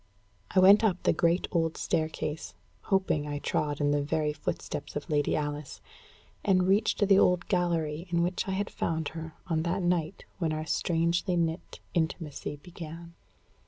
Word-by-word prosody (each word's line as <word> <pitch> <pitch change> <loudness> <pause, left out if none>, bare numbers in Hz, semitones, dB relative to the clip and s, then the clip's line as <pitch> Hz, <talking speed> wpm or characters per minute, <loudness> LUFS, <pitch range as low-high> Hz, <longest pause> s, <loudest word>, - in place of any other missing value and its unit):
I - - +3
went 200 +4 +8
up 190 -5 +1
the - - +4
great 170 +2 +2
old 165 -2 0
staircase, 155 -1 -2 0.3
hoping 190 -6 +1
I 145 0 -3
trod 145 0 -1
in 145 -1 +2
the 145 0 +2
very 150 +1 0
footsteps 145 0 -5
of 145 - -4
Lady 145 -1 +2
Alice, 145 -1 -4 0.6
and 185 -2 +3
reached 205 +1 +3
the 195 -1 +6
old 180 -1 +3
gallery 170 -3 0
in 170 0 +2
which 180 +2 -1
I 190 - -1
had 200 +2 -2
found 160 -2 -2
her 160 0 -8
on 165 -4 0
that 175 +3 -1
night 175 0 -1
when 165 -3 0
our 155 0 -3
strangely 170 +3 +1
knit 165 +1 -2
intimacy 160 -3 -2
began. 165 +1 -10
165 Hz, 160 wpm, -29 LUFS, 155-180 Hz, 0.6 s, went